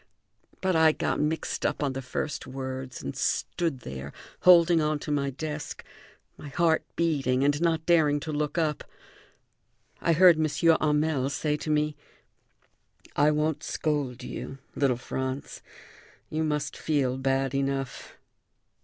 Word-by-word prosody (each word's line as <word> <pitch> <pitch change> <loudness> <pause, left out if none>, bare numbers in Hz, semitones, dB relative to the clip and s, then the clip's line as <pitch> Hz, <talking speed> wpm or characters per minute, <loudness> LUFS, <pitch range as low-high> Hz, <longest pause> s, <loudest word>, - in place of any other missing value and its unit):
But 185 -2 +1
I 160 -1 +5
got - - -1
mixed 155 +1 -1
up - - 0
on 140 -2 0
the 135 - -4
first 135 +3 -4
words 130 -1 -6
and 70 - -5
stood 165 -7 -1
there, 70 - -7 0.3
holding 170 -2 +6
on 155 0 +1
to 150 - -6
my 140 -1 +1
desk, 150 +2 -5 0.6
my - - -8
heart 165 +2 +2
beating, 140 -6 +1
and 145 +2 +2
not 165 -2 +1
daring 155 -4 +4
to 155 - -4
look 150 +2 -2
up. 155 -3 0 1.2
I 170 - +3
heard 175 0 +7
M. 155 - +3 0.3
Hamel 150 -3 +1
say 150 +2 -1
to 155 - -6
me: 150 0 +1 1.2
"I 145 +1 +4
won't 150 0 0
scold 145 -5 -2
you, 135 - -6 0.2
little 135 -4 +1
Franz; 130 +2 -4 0.7
you 155 +1 0
must 150 -1 -1
feel 135 -4 0
bad 135 0 0
enough. 135 -1 -3
150 Hz, 140 wpm, -27 LUFS, 135-160 Hz, 1.2 s, heard